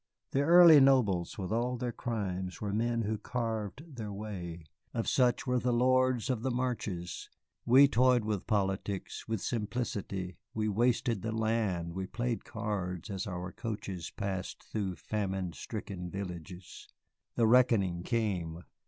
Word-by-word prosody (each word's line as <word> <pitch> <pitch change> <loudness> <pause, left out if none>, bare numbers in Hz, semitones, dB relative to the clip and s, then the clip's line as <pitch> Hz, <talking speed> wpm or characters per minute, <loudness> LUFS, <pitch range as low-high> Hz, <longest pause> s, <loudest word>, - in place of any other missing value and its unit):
The 135 - +2
early 165 0 +9
nobles, 120 -11 +3
with 95 -2 -4
all 120 +2 0
their 120 0 -2
crimes, 95 -7 -3
were 100 -2 -3
men 115 +2 +1
who 110 0 -2
carved 115 - -4
their 105 -3 -4
way. 95 -5 -6 0.3
Of 115 - -1
such 125 -2 +2
were 125 -1 +2
the 125 +1 0
lords 130 0 +3
of 120 -4 -2
the 130 - 0
Marches. 115 -9 -3 0.4
We 135 +4 +8
toyed 125 -2 +3
with 105 -3 -2
politics, 100 -2 -1
with 110 -3 -2
simplicity, 100 -6 -3 0.2
we 110 -1 0
wasted 120 0 +1
the 110 - -2
land, 110 -7 0
we 95 +1 -4
played 120 +1 -2
cards 100 -5 -4
as 95 -1 -3
our 90 -1 -4
coaches 100 -7 -5
passed 95 -3 -4
through 100 -4 -2
famine 95 -4 -3
stricken 95 -5 -6
villages. 90 -1 -7 0.5
The 115 - +3
reckoning 110 -7 +4
came. 90 -7 -2
110 Hz, 145 wpm, -31 LUFS, 95-120 Hz, 0.5 s, early